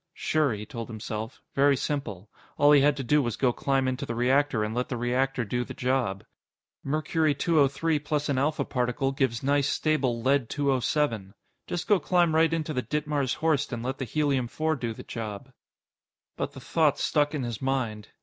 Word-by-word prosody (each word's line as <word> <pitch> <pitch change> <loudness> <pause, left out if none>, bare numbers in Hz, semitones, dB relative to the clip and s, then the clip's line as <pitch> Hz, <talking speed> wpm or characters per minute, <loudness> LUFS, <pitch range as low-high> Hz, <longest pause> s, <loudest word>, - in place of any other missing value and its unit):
Sure, 155 -4 +1
he 105 -1 -5
told 115 -4 -6
himself. 110 0 -6
Very 140 0 +4
simple. 120 -9 -3 0.3
All 145 0 +6
he 145 -2 +7
had 145 +1 +3
to 135 - -3
do 150 +4 +3
was 120 -4 -2
go 125 -3 +2
climb 135 0 0
into 130 0 -2
the 115 - -4
reactor, 130 -1 +2
and 105 +1 -2
let 125 +2 -2
the 125 - -2
reactor 125 +1 0
do 125 +4 -1
the - - -9
job. 125 -6 -1 0.6
Mercury 155 +1 +1
203 155 +1 +2
plus 150 0 -2
an 140 -3 +1
alpha 150 +3 0
particle 125 +2 -1
gives 130 -4 -1
nice, 140 0 +2
stable 135 -6 0
Lead 130 0 +1
207. 130 -6 0 0.3
Just 175 - -3
go 205 -3 +4
climb 175 -3 +2
right 160 0 +4
into 160 -1 -2
the 125 - 0
Ditmars 145 +1 -1
Horst 155 -3 0
and 120 -2 -4
let 130 +2 -3
the 135 - -2
Helium 140 -1 0
4 155 +6 -1
do 120 -4 -3
the 110 - -9
job. 115 +3 -6 0.8
But - - -3
the - - -9
thought - - +2
stuck 145 +1 +1
in 140 - -2
his 120 -3 -4
mind. 120 -6 -2
135 Hz, 190 wpm, -27 LUFS, 120-150 Hz, 0.8 s, he